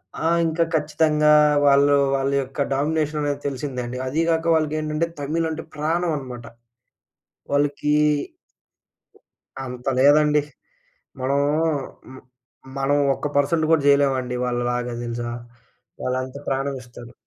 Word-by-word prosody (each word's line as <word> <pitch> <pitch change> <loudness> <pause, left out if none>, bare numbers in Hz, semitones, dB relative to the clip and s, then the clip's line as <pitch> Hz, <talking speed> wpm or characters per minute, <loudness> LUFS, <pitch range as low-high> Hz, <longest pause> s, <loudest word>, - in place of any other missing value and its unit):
ఆ! 160 - -2 0.2
ఇంకా 165 +1 +1
ఖచ్చితంగా 150 0 +2 0.3
వాళ్ళు 140 0 +5 0.2
వాళ్ళ 135 0 0
యొక్క 135 +2 -6
డామినేషననేది 150 0 -1
తెలిసిందండి. 125 -2 -4
అది 155 +5 0
గాక 165 0 +1
వాళ్ళకేంటంటే, 155 +1 -1
తమిళ్ 160 +3 -1
అంటే 160 - -5
ప్రాణమనమాట. 150 -6 -2 1.1
వాళ్ళకి 145 +1 +1 1.7
అంత 125 0 -8
లేదండి. 150 +1 +5 0.8
మనము 140 +2 +1 0.7
మ్ 130 - -11 0.6
మనం 140 +1 +1 0.2
ఒక్క 150 - -4
పర్సెంట్ 155 +3 +2
గూడా 155 -3 +3
జేయలేమండి 135 -3 +2
వాళ్ళలాగా 120 0 -2
దెలుసా? 120 0 -4 0.7
వాళ్ళంత 130 +1 -3
ప్రాణమిస్తారు. 130 -3 -5
140 Hz, 95 wpm, -22 LUFS, 130-150 Hz, 1.7 s, వాళ్ళు